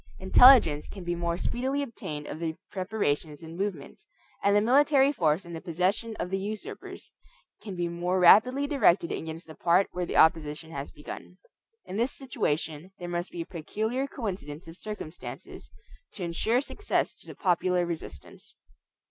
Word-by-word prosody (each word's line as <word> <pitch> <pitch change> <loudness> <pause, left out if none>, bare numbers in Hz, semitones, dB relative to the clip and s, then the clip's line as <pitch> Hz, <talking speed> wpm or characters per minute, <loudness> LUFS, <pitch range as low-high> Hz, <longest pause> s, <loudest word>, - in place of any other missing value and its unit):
Intelligence 190 - +7
can 195 - -9
be 175 0 -1
more 170 0 -1
speedily 265 +8 -1
obtained 155 - -6
of 155 - -6
their 165 -1 -2 0.2
preparations 175 -7 -2
and 165 +1 -9
movements, 195 - -5 0.4
and 200 0 +4
the - - +6
military 275 +4 +4
force 165 - +1
in 170 - -9
the 165 - -6
possession 185 +6 -1
of 180 - -4
the 195 - 0
usurpers 210 +2 -7 0.5
can 200 -4 -7
be 175 -1 -1
more 175 +2 -1
rapidly 250 +10 +6
directed 205 - +3
against 160 +1 -5
the 160 - -11
part 175 +4 +2
where 180 -1 -3
the - - -2
opposition 160 0 +3
has 140 -2 -5
begun. 150 +4 -10 0.5
In 190 - -6
this 240 +4 +1
situation 160 - -3
there 175 - -7
must 175 +1 -2
be 170 - -6
a - - -5
peculiar 220 - -3
coincidence 180 - -6
of 165 - -10
circumstances 195 -5 -8 0.4
to 190 - -6
insure 220 +9 +1
success 415 +8 -1
to - - -15
the - - -9
popular 180 -1 +1
resistance. 160 - -8
180 Hz, 165 wpm, -28 LUFS, 165-220 Hz, 0.5 s, Intelligence